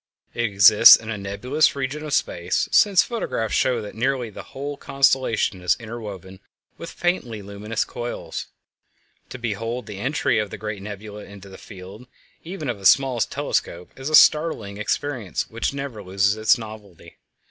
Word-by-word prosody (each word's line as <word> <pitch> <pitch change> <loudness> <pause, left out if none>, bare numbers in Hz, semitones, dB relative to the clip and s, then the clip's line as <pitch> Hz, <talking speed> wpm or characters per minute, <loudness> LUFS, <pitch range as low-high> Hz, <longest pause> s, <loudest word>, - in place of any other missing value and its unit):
It 120 - -1
exists 105 +2 +8
in 115 0 -6
a 105 - -4
nebulous 115 +12 0
region 140 +2 -4
of 150 -3 -1
space, 85 +1 -1
since 200 -4 +5
photographs 165 - -3
show 125 -4 +1
that 105 - -8
nearly 120 0 -1
the - - -9
whole 145 +2 -7
constellation 135 -8 +1
is 90 -1 +2
interwoven 105 -5 -9 0.4
with 170 - -9
faintly 125 - -2
luminous 100 +3 -4
coils. 120 0 -6 0.8
To - - -7
behold 115 +1 -4
the 105 -2 -8
entry 130 -1 0
of 105 -1 -2
the - - -8
great 105 -1 -6
nebula 105 +1 -8
into 100 -1 -13
the 95 - -12
field 100 +4 -12 0.4
even 170 -3 -6
of 120 -5 -3
a 95 - -11
small 130 +2 +4
telescope 90 -4 -2
is 135 +2 -5
a 155 - +4
startling 135 -12 +4
experience 115 -2 -3
which 115 +1 -2
never 140 -6 -6
loses 100 +2 +1
its 110 +3 +3
novelty. 105 -7 -12
110 Hz, 160 wpm, -22 LUFS, 100-135 Hz, 0.8 s, exists